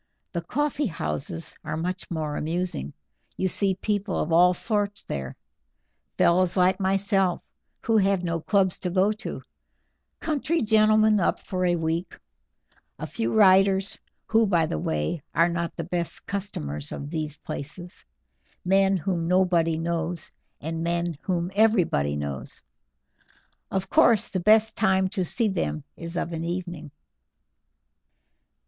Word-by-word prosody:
The 170 - -1
coffee 290 - -1
houses 165 -1 -4
are - - -3
much 180 +4 -4
more 155 -3 -3
amusing; 165 - -3 0.4
you 190 - +1
see 190 +1 +2
people 205 0 -2
of 160 - -2
all 175 +2 +6
sorts 205 +1 -1
there 65 -2 -5 0.8
fellows 180 +1 +3
like 185 +2 +3
myself, 195 -1 +1 0.4
who 225 -1 +2
have 195 -2 +2
no 165 -2 -2
clubs 190 -1 +2
to 180 - -2
go 190 +3 +3
to; 215 +3 -6 0.8
country 315 0 0
gentlemen 215 0 +4
up 185 - +1
for 185 -1 -2
a 175 - +2
week; 165 +1 -2 0.8
a - - -5
few 115 +1 -2
writers, 195 -1 +4 0.3
who, 225 0 +3
by 170 -4 +3
the 80 - -3
way, 75 - -2
are 170 +1 +4
not 170 0 -3
the 165 - -4
best 170 0 -3
customers 75 - -4
of 145 +1 -6
these 155 -3 -3
places; 160 +5 -7 0.6
men 195 +1 +3
whom 170 -1 -2
nobody 175 -3 +2
knows, 170 0 -3 0.3
and 160 +2 -4
men 170 0 -1
whom 180 -1 -2
everybody 185 - +2
knows. 70 -2 -5 1.1
Of 190 0 -2
course, 235 -5 +4
the 185 - -2
best 220 +3 +4
time 190 -2 +2
to 185 -1 0
see 220 +6 +1
them 170 -6 -2
is 170 +1 -6
of 170 - -2
an 165 0 -3
evening." 175 -3 -4
180 Hz, 140 wpm, -25 LUFS, 165-195 Hz, 1.1 s, all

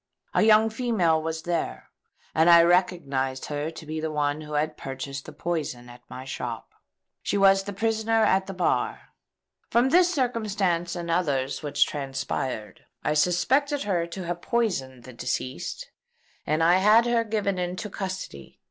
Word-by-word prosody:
A - - +3
young 220 0 +5
female 215 -10 +1
was 160 0 -4
there; 175 -1 -3 0.4
and 160 +2 +4
I 170 -1 +9
recognised 140 -7 +1
her 150 +1 -3
to 160 - -10
be 155 +1 -4
the 160 0 -2
one 150 0 -1
who 150 0 -8
had 155 +1 0
purchased 135 0 -6
the - - -9
poison 145 -6 -4
at 120 0 -13
my 130 - -8
shop. 120 -3 -5 0.5
She - - -1
is 195 0 +5
the 200 +1 -6
prisoner 225 +2 +1
at 190 -2 +2
the 195 - -5
bar. 180 - -1 0.6
From 240 +3 +3
this 355 +3 +5
circumstance 205 - 0
and 170 -1 -4
others 140 -6 0
which 145 -1 +2
transpired, 135 -6 -4 0.2
I - - +1
suspected 265 - +2
her 175 -5 0
to 180 +1 -7
have 175 0 -4
poisoned 135 - -1
the 130 - -11
deceased; 125 +2 -4 0.6
and 155 +2 +1
I 175 +2 +5
had 215 +5 +5
her 240 -1 +2
given 210 -4 -1
into 180 +4 -3
custody. 185 - -7
170 Hz, 160 wpm, -26 LUFS, 145-205 Hz, 0.6 s, I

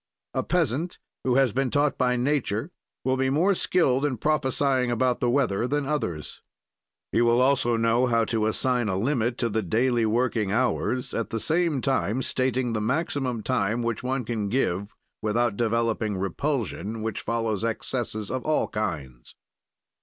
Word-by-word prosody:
A - - +1
peasant 165 0 0 0.3
who 125 -1 +1
has 135 -5 +3
been 135 +1 +1
taught 145 +1 +2
by 125 -1 +2
nature 130 - 0 0.3
will 130 +1 +1
be 130 0 +1
more 170 +9 +3
skilled 145 -8 +2
in 140 -4 0
prophesying 135 -2 +1
about 120 +1 +1
the 120 - +1
weather 120 -4 +1
than 145 +1 0
others. 90 - -3 0.7
He 115 - +2
will 120 0 +4
also 125 -3 +3
know 115 +2 +2
how 115 -2 +2
to 110 -1 0
assign 120 0 0
a 95 - 0
limit 120 +1 0
to 120 - +1
the 110 0 0
daily 115 +4 +1
working 115 -3 +1
hours, 125 +2 0
at 115 - -2
the 115 - -2
same 160 -1 +1
time 130 -1 0
stating 130 -2 0
the 110 - -1
maximum 130 -2 -1
time 110 +5 0
which 115 -2 -2
one 125 -1 -2
can 110 -3 -2
give 100 -4 -1 0.3
without 110 +1 +1
developing 115 -2 0
repulsion, 110 - -2
which 110 -1 -3
follows 115 -3 -1
excesses 115 -2 -2
of 130 -1 -2
all 155 0 +1
kinds. 70 - -5
120 Hz, 160 wpm, -26 LUFS, 110-130 Hz, 0.7 s, will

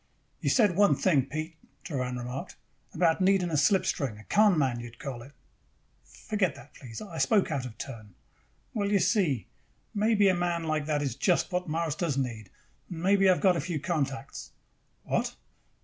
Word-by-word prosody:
"You - - 0
said 210 -8 +4
one 205 +1 +5
thing, 145 -9 +2
Pete," 155 +2 -5 0.3
Doran 125 -5 -3
remarked. 125 +8 -6 0.4
"About 170 -1 +2
needing 185 -2 +3
a - - 0
slipstring. 150 - +1
A 110 - -13
con 205 - +4
man, 130 -5 +1
you 120 - -7
would 115 0 -15
call 130 -3 -6
it." 130 +4 -12 0.7
"Forget 200 -8 -2
that. 130 - -14
Please. 120 - -9
I 175 -6 -7
spoke 205 -7 +3
out 135 -4 -2
of 115 - -12
turn." 110 -7 -9 0.6
"Well, 205 -3 -1
you 205 - +4
see, 175 - +1 0.5
maybe 210 -1 +3
a 190 - +5
man 175 -1 -1
like 155 -2 -1
that 150 -2 0
is 135 -5 -2
just 175 +7 +1
what 180 -1 -2
Mars 160 -1 -1
does 160 -3 -2
need. 115 -7 -3 0.4
And 170 -1 -6
maybe 195 0 +4
I - - +7
have - - -4
got 185 -2 +5
a 165 - -1
few 165 0 -3
contacts." 140 -4 -3 0.5
"What?" - - -1
160 Hz, 185 wpm, -28 LUFS, 135-185 Hz, 0.7 s, I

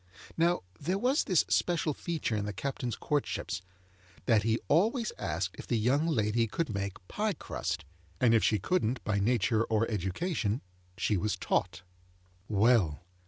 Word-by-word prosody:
Now, 170 +2 +2 0.2
there 180 +6 0
was 255 +7 +2
this 185 -5 +3
special 165 -3 +1
feature 160 -8 -2
in 105 -1 -1
the 105 - -3
Captain's 125 0 -3
courtships, 135 - -2 0.6
that 110 -3 +4
he 110 +1 +1
always 220 - +2
asked 85 +3 -2
if - - -8
the 120 - +1
young 135 +8 +2
lady 115 -5 +2
could 150 +3 -2
make 100 -2 -4
pie 210 0 -1
crust; 85 - -4 0.3
and 120 -2 +4
if 115 - +4
she 105 - +3
couldn't 125 - 0
by 105 -2 0
nature 110 0 +2
or 110 0 +1
education, 105 - -1 0.4
she 105 - +1
was 105 +2 -1
taught. 90 0 -1 0.7
Well. 105 -7 +3
115 Hz, 155 wpm, -30 LUFS, 100-160 Hz, 0.7 s, that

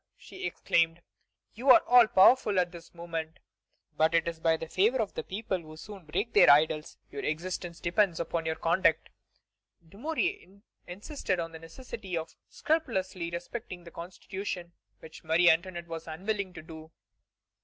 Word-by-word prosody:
she 380 0 -7
exclaimed, 165 0 +1 0.5
"you 250 +5 -2
are 255 - +9
all 245 -2 +7
powerful 215 0 +5
at 175 -1 0
this 170 -1 -12
moment, 165 -2 -5 0.6
but 160 +1 +2
it 165 0 +2
is 165 -1 -4
by 160 0 +2
the 165 - -7
favor 220 +10 +2
of 215 -3 -1
the - - -3
people, 195 -2 -3
who 155 -1 -12
soon 195 0 -11
break 195 +9 -3
their - - +7
idols. 150 +1 +3
Your 140 - -5
existence 170 +2 -4
depends 175 0 +1
upon 165 -1 -2
your 160 - 0
conduct." 165 -1 +1 0.8
Dumouriez 265 - -4 0.2
insisted 190 - -3
on 165 -1 -4
the 160 - -10
necessity 180 +1 -7
of 165 0 -5 0.2
scrupulously 190 - -1
respecting 175 +2 -7
the 170 - -12
Constitution, 180 0 -7 0.3
which 160 0 -12
Marie 165 +2 +5
Antoinette 175 +1 -2
was 165 -1 -7
unwilling 195 +4 -3
to 170 - -10
do. 160 0 -11
175 Hz, 155 wpm, -29 LUFS, 165-200 Hz, 0.8 s, are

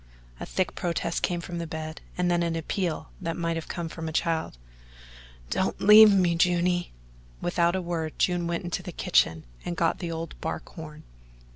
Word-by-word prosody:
A - - -6
thick 185 -1 -1
protest 170 -1 -2
came 175 -1 0
from 170 0 -5
the 170 - -4
bed, 155 0 -6 0.2
and 180 0 +1
then 175 0 +2
an 170 -1 0
appeal 165 0 -2
that 165 -2 -3
might 165 -1 -1
have 165 - -5
come 170 -2 -4
from 160 0 -5
a - - -5
child. 160 - -1 0.9
"Don't 190 - 0
leave 210 +1 +9
me, 180 -4 +3
Juny." 175 +1 +2 0.5
Without 175 0 +1
a 190 - -1
word 165 -2 -3
June 175 -1 +1
went 170 +1 -2
into 175 +1 -3
the 180 0 -7
kitchen 80 - +2 0.2
and 175 - -4
got 165 -1 +1
the 175 -2 -4
old 165 0 -5
bark 160 - -4
horn. 155 -2 -10
170 Hz, 185 wpm, -27 LUFS, 165-175 Hz, 0.9 s, leave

